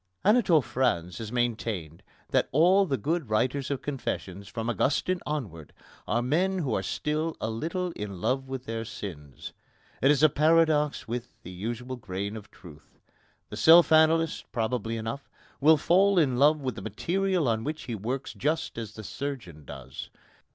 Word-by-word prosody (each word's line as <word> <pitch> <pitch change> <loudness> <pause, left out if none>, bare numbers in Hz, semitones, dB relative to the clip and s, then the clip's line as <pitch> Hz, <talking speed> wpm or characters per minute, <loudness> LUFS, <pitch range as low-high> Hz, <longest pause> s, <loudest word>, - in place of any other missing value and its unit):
Anatole 195 - +4
France 110 -8 -1
has 110 -1 -6
maintained 110 -9 -2 0.3
that - - +2
all 185 +7 +4
the 135 - 0
good 160 -3 -2
writers 130 +5 0
of 135 -2 -3
confessions, 100 -8 -4
from 115 0 -5
Augustine 145 +9 +1
onwards, 100 - -5 0.3
are 120 +2 +1
men 180 +9 +1
who 140 -10 -1
are 95 - 0
still 155 - -2
a 110 - -2
little 170 +10 -3
in 100 - -6
love 130 +6 -1
with 130 -1 -5
their 115 0 -3
sins. 75 - -8 0.5
It 135 - +4
is 145 0 +3
a - - +10
paradox 150 - +2
with 120 +1 -4 0.2
the 90 - -9
usual 120 +7 -5
grain 100 -1 -5
of 105 -2 -9
truth. 75 -4 -16 0.5
The - - -7
self 165 0 +7
analyst, 160 0 +3
probably 115 -1 -2
enough, 115 +5 -5 0.3
will 155 +3 +6
fall 190 +6 +3
in 135 -7 +3
love 150 +2 +5
with 130 -2 -2
the 110 - -8
material 180 - -1
on 110 -1 0
which 155 +4 -4
he 120 - -5
works 120 +6 -4
just 150 -4 -2
as 110 -2 -6
the 110 - -8
surgeon 100 - -6
does. - - -9
130 Hz, 165 wpm, -27 LUFS, 110-155 Hz, 0.5 s, a